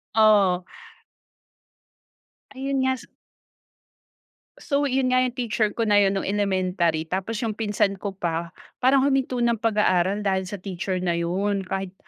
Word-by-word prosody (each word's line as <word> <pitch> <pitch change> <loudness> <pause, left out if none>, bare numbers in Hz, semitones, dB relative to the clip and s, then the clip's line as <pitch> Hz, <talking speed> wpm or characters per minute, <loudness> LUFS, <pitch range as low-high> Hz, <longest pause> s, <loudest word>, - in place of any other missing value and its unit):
Oo. 200 -5 +4 1.9
Ayun 270 0 -1
nga 260 0 +1
sa 240 - -14 1.5
So, 285 -1 -1
yun 255 -1 +1
nga 255 - +4
yung 250 -1 -1
teacher 220 -3 0
ko 230 - 0
na 205 -1 +4
yun 195 0 +2
nung - - -3
elementary, 185 -5 0
tapos 190 +6 -3
yung 220 - -1
pinsan 205 -3 0
ko 195 -1 -4
pa, 170 -1 -2 0.3
parang 265 +1 +4
huminto 265 -2 +1
ng 235 -2 +1
pag-aaral 205 -2 +1
dahil 190 -1 0
sa 205 - -5
teacher 185 0 -4
na 180 -1 0
yun. 190 +4 -1
Kahit, 195 -1 -4
205 Hz, 145 wpm, -24 LUFS, 185-240 Hz, 1.9 s, Oo